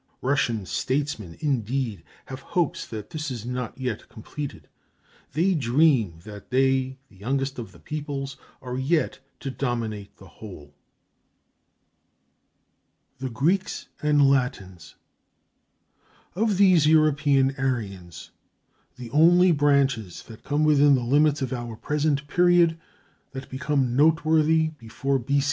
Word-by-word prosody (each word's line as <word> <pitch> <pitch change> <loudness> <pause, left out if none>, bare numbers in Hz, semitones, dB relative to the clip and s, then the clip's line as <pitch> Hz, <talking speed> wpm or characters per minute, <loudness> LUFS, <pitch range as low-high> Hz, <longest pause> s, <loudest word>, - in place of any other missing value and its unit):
Russian 120 -6 0
statesmen, 130 - -3
indeed, 130 -5 -1 0.2
have 130 0 -8
hopes 170 +1 -2
that 105 -2 -8
this 155 -1 -4
is 120 -4 -6
not 125 -1 -4
yet 125 -5 -4
completed. 140 +6 -8 0.7
They 175 +6 +2
dream 125 - +2
that 105 -1 -11
they, 130 0 +1
the 100 - -21
youngest 135 +5 -2
of 115 - -7
the - - -17
peoples, 145 -3 -5 0.3
are 125 0 -4
yet 155 +5 0 0.2
to 135 - -4
dominate 115 -6 -4
the 95 - -15
whole. 85 -7 -12 2.5
THE 130 0 -4
GREEKS 165 - -1
AND 150 -2 +4
LATINS 125 - -2 1.4
Of 210 +1 0
these 185 -6 +5
European 145 -3 +3
Aryans 100 -10 -4 0.6
the 125 -2 -9
only 175 +5 +5
branches 140 - +1
that 110 -2 -14
come 150 +1 0
within 145 -2 +5
the 125 - -1
limits 145 +3 +2
of 130 - -3
our 120 -2 -5
present 145 +4 -1
period, 175 +1 +3 0.5
that 135 0 -8
become 130 -2 -1
noteworthy 160 +1 +3
before 135 +4 -2
B. 140 +4 0
135 Hz, 120 wpm, -25 LUFS, 120-150 Hz, 2.5 s, these